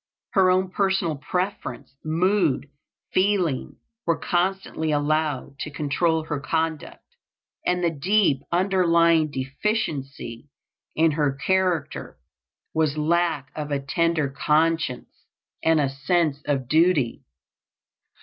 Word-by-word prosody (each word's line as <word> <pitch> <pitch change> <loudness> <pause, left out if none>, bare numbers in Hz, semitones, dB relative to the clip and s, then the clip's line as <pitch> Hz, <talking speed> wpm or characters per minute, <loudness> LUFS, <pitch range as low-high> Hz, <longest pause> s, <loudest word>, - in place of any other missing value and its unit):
Her 190 -2 +4
own 185 0 +2
personal 190 -5 +1
preference, 180 -4 -4
mood, 170 -2 +1 0.5
feeling, 185 -8 +1 0.3
were 170 - +2
constantly 180 -3 -1
allowed 145 -2 -1
to - - -4
control 155 +3 0
her 150 -2 -3
conduct; 160 +1 -2 0.6
and 180 0 +1
the 170 - +2
deep 165 -2 +2
underlying 170 -3 +3
deficiency 135 - -3 0.5
in 160 0 +4
her 145 -2 +1
character 180 +1 -1 0.6
was 155 -2 +1
lack 160 -3 0
of 150 -1 -4
a 140 -1 0
tender 160 +2 0
conscience 150 -1 0 0.4
and 160 -1 +4
of 145 - +3
a - - -1
sense 150 +1 0
of 135 -4 0
duty. 155 -4 +2
160 Hz, 110 wpm, -24 LUFS, 145-180 Hz, 0.6 s, Her